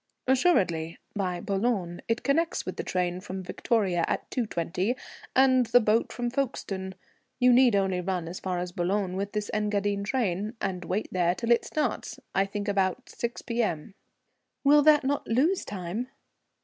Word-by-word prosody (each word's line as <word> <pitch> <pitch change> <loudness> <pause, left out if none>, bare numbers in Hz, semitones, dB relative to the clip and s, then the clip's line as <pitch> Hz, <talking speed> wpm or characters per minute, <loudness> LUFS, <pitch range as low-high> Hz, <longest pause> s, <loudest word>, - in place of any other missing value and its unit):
"Assuredly 185 - +2 0.2
by 185 -3 -1
Boulogne. 195 -3 -1
It 230 +2 0
connects 320 +6 +1
with - - -4
the - - -2
train 180 -1 -1
from 190 -1 -6
Victoria 185 -3 0
at - - -2
2.20 205 -1 -1 0.4
and 260 -2 +5
the 240 +2 +6
boat 220 0 +2
from 240 -1 -3
Folkestone. 195 -8 -3 0.4
You 250 -1 +5
need 245 -3 +6
only 190 -2 +1
run 180 -2 -2
as 175 +2 -6
far 185 -1 -2
as 175 0 -3
Boulogne 185 +2 -1
with 200 +1 -3
this 210 -1 -2
Engadine 205 -1 0
train, 210 -2 -1
and 185 -2 -3
wait 200 +5 -1
there 175 -1 +2
till 235 +2 -2
it 235 - +4
starts. 295 -7 -2
I 195 +1 +2
think 205 +1 -4
about 195 -2 0
6 235 0 -4
P.M." 220 -7 -2 0.7
"Will 290 +1 +6
that 300 -1 +6
not 285 +2 -1
lose 300 +12 +2
time?" 200 +5 -4
205 Hz, 160 wpm, -27 LUFS, 185-245 Hz, 0.7 s, the